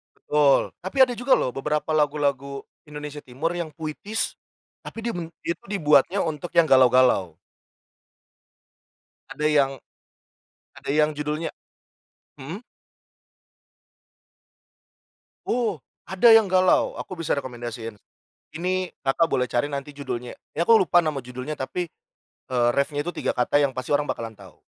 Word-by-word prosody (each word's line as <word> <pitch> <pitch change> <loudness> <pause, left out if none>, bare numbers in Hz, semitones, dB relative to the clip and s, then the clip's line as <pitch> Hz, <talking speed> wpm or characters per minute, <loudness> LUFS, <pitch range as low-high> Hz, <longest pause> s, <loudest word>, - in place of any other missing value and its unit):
Betul. 145 -2 +2
Tapi 190 +9 -6
ada 250 -1 +1
juga 250 +2 +3
lho, - - 0
beberapa 150 +3 -2
lagu-lagu 140 -2 0 0.2
Indonesia 150 0 -7
Timur 140 +7 -3
yang 170 -2 -4
puitis, 165 +8 -4 0.5
tapi 225 0 -8
dia 235 - -1
bum 165 -2 -5 0.2
itu 170 - -3
dibuatnya 165 0 +3
untuk 160 +1 -4
yang 170 -1 +6
galau-galau. 125 -9 +4 1.9
Ada 150 - -4
yang 145 -3 +3 1.0
ada - - -9
yang 150 +1 +3
judulnya 150 +2 -3 0.9
hmm? 170 - -7 2.8
Oh, 225 - 0 0.2
ada 190 +5 +5
yang 220 -4 +6
galau, 185 0 +3
aku 185 - -6
bisa 165 - -2
rekomendasiin. 120 -4 -6 0.6
Ini 185 +1 -1 0.2
Kakak, 160 +5 +3
boleh 125 - +2
cari 125 +5 0
nanti 140 +1 -5
judulnya. 125 -4 -5 0.2
Ya 170 - +3
aku 225 -1 +7
lupa 175 -1 +4
nama 145 -3 -2
judulnya, 125 +4 -6
tapi, 175 +6 -3 0.6
eee, 120 -1 +3
reffnya 145 +1 0
itu 175 - -4
3 - - -1
kata 125 +3 +2
yang 135 - +1
pasti 130 +3 -3
orang 145 0 0
bakalan 115 -4 -5
tahu. 95 -4 -15
150 Hz, 130 wpm, -24 LUFS, 135-175 Hz, 2.8 s, aku